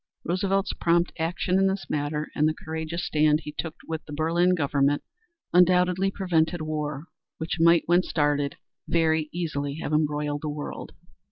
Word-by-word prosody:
Roosevelt's 195 +3 0
prompt 170 +1 +2
action 180 +3 0
in 195 - +4
this 190 0 -2
matter 150 +1 -2
and 150 - +2
the 155 - -3
courageous 160 +2 -4
stand 150 0 +3
he 150 - -7
took 160 +1 -5
with 160 -1 -4
the - - -11
Berlin 170 +4 +2
government 145 -2 +1 0.5
undoubtedly 180 +1 +4
prevented 170 -4 0
war, 150 -1 -3 0.3
which 160 +1 -3
might, 170 0 +5
when 175 +2 +4
started, 145 -4 0 0.3
very 160 -2 +2
easily 145 -5 -3
have 155 -1 -4
embroiled 150 -1 0
the 155 - -3
world. 145 0 -6
160 Hz, 155 wpm, -26 LUFS, 150-175 Hz, 0.5 s, might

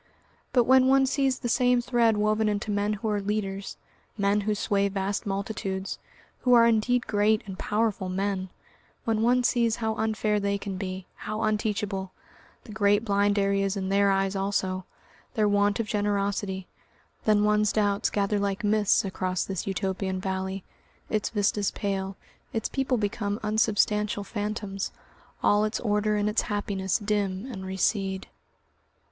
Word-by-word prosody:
But 245 - +4
when 260 +2 +5
one 270 0 +5
sees 270 -1 +1
the - - -4
same 245 +1 +3
thread 235 -3 +2
woven 215 +1 +2
into 210 +1 -2
men 205 +1 0
who 215 +2 -4
are 205 -1 0
leaders, 195 -1 -3 0.4
men 200 0 +2
who 210 +1 0
sway 200 -1 +1
vast 195 +1 -2
multitudes, 195 -1 -3 0.4
who 250 - +3
are 235 -1 +7
indeed 235 +2 +2
great 210 +1 +2
and 190 -1 -8
powerful 210 -3 0
men; 190 0 -2 0.6
when 220 -1 +1
one 245 +2 +3
sees 235 -2 +2
how 220 -2 -1
unfair 215 -1 0
they 200 0 0
can 200 -1 -5
be, 185 -1 -5
how 215 0 -4
unteachable, 210 -3 -1 0.5
the 220 - -11
great 205 0 +2
blind 205 0 +2
areas 195 0 +1
in 190 -1 -2
their 200 0 +3
eyes 195 0 +1
also, 190 -1 -1 0.5
their 215 -1 +3
want 205 0 +2
of 230 - 0
generosity, 200 -2 -1 0.6
then 210 -1 +4
one's 210 0 +3
doubts 205 -2 +1
gather 205 0 0
like 200 +2 -1
mists 210 -1 +3
across 185 -1 -2
this 190 -2 -4
Utopian 190 -1 -2
valley, 190 0 -3 0.5
its 215 -1 0
vistas 205 -1 +1
pale, 195 -1 -3 0.4
its 225 - -1
people 265 -2 0
become 205 0 -2
unsubstantial 210 -1 +1
phantoms, 205 -1 -4 0.5
all 205 +1 +4
its 215 +2 -1
order 210 -1 +1
and 205 0 +1
its 210 +1 +2
happiness 200 -2 -1
dim 205 -2 -1
and 190 -4 -6
recede.... 190 0 0
205 Hz, 150 wpm, -27 LUFS, 195-215 Hz, 0.6 s, are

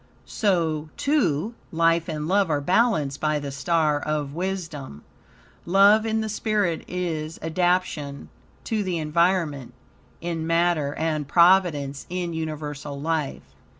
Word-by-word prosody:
So, 165 -7 0
too, 230 - +1 0.2
life 165 0 +2
and 155 -1 -3
love 195 0 +2
are 150 -2 +1
balanced 180 - +1
by 155 -1 +1
the 145 -1 -5
star 150 +1 +1
of 150 -2 -2
wisdom. 165 - -5 0.6
Love 200 +5 +5
in 220 0 0
the 220 - -2
spirit 210 -5 0
is 165 -3 -3
adaption 165 -4 -1 0.3
to 220 -2 -1
the 185 -3 -2
environment 155 -5 0 0.4
in 165 -2 -3
matter 165 -4 +1
and 155 -3 -1
providence 170 -5 +3
in 175 -1 -3
universal 150 -3 -5
life. 155 -1 -2
165 Hz, 120 wpm, -24 LUFS, 150-185 Hz, 0.6 s, Love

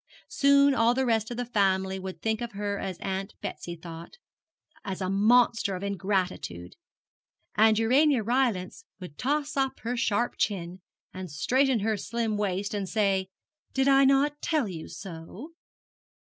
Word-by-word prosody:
Soon 280 -1 +4
all 235 -1 +3
the 265 0 +1
rest 225 -2 +1
of 240 - -5
the 245 - -2
family 190 -4 +1
would 190 0 -8
think 220 0 0
of 235 -2 -5
her 200 0 -3
as 190 -2 -4
Aunt 195 +1 -4
Betsy 175 - -6
thought 165 - -10 0.7
as 190 -1 -4
a 185 -1 -2
monster 220 0 +3
of 185 - -6
ingratitude; 190 - -2 0.8
and 220 0 +4
Urania 255 +3 +3
Rylance 235 - 0 0.2
would 180 -6 -10
toss 290 +2 -1
up 270 -1 -1
her 240 +2 -2
sharp 235 0 0
chin, 185 -2 -2 0.3
and 185 -1 -7
straighten 255 - +1
her 215 +1 0
slim 225 +1 -2
waist, 200 0 -2
and 200 -3 -3
say, 195 -3 +1 0.5
'Did 265 +1 +2
I 275 0 +6
not 280 +2 +2
tell 305 -8 0
you 165 -4 -7
so?' 190 - -9
210 Hz, 155 wpm, -27 LUFS, 190-245 Hz, 0.8 s, I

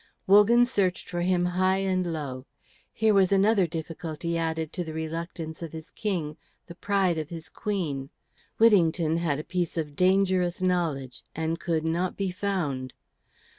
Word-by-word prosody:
Wogan 210 +5 +6
searched 190 -6 0
for 175 -1 -3
him 175 0 +2
high 185 +2 +2
and 185 -2 0
low. 135 -5 -5 0.4
Here 220 -1 +2
was 195 -2 +4
another 195 -1 +4
difficulty 165 0 -4
added 160 -1 -2
to 180 - -2
the 160 -2 -7
reluctance 160 0 -5
of 165 -2 -6
his 160 -1 -9
King, 170 -8 -3 0.3
the 170 - -10
pride 185 -2 +1
of 155 -1 -5
his 165 -2 -7
Queen. 155 -10 -3 0.5
Whittington 170 -7 +4
had 165 -4 0
a 150 - -5
piece 175 -1 -2
of 150 -3 -3
dangerous 185 -1 +2
knowledge, 160 -9 -1
and 160 +1 -2
could 165 -3 -1
not 175 +3 -1
be 195 -2 -1
found. 175 -10 -2
170 Hz, 155 wpm, -27 LUFS, 160-190 Hz, 0.5 s, Wogan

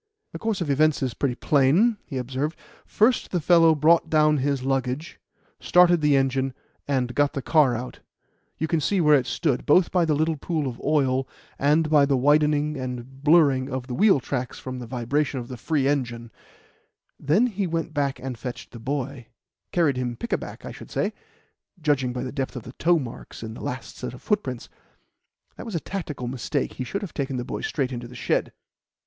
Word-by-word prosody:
"The - - -7
course 220 -4 -1
of 165 - -2
events 155 +1 +2
is 130 -3 -1
pretty 130 -1 -1
plain," 155 - +3
he 135 - -5
observed. 130 +5 -3 0.3
"First 230 +3 +2
the 180 - 0
fellow 165 0 +5
brought 160 +2 +4
down 155 -1 +4
his 140 -1 -1
luggage, 135 +4 -2 0.4
started 175 -2 +5
the 150 -1 +4
engine, 135 -1 0 0.3
and 130 -3 0
got 145 +2 +2
the 140 - -3
car 145 -7 +4
out 125 +2 -6 0.6
you 160 - -1
can 160 -1 0
see 195 +6 +1
where 150 -3 +5
it 130 -3 +1
stood, 130 +2 0
both 175 +4 +4
by 180 -2 +3
the 155 -2 +1
little 155 +1 0
pool 155 0 -2
of 120 -2 -6
oil, 135 -3 +1 0.3
and 150 +3 +3
by 150 -2 +4
the 140 -2 +2
widening 150 +2 +2
and 130 +1 -6
blurring 145 -4 +4
of 130 -2 -4
the 130 - -6
wheel 195 - +4
tracks 125 -1 -4
from 130 -1 -6
the 120 - -7
vibration 130 +4 -1
of 120 - -8
the 130 - -5
free 135 +4 0
engine; 120 -5 -2 0.9
then 155 - +3
he 205 -5 -2
went 165 -1 -3
back 140 -2 0
and 125 -3 -6
fetched 125 -1 -7
the 120 - -10
boy 135 -1 -4 0.4
carried 155 -7 +2
him 125 -1 -2
pick 235 - -4
a - - +3
back, - - -9
I - - -6
should - - -11
say, - - -1 0.7
judging 145 -5 +1
by 125 - -4
the 130 - -4
depth 135 -2 -3
of 125 - -6
the 125 - -10
toe 175 +1 +4
marks 125 -5 -7
in 110 0 -6
the - - -10
last 125 0 -6
set - - -6
of - - -14
footprints. 135 - -1 0.9
That - - -8
was 215 - -5
a - - +1
tactical 150 -9 -5
mistake. 125 0 -2
He 130 - -4
should 200 +11 -4
have 195 - -7
taken 135 -2 -2
the 125 - -3
boy - - -5
straight 135 -3 -2
into 120 -1 -5
the 125 - -13
shed." - - 0
140 Hz, 205 wpm, -24 LUFS, 130-155 Hz, 0.9 s, fellow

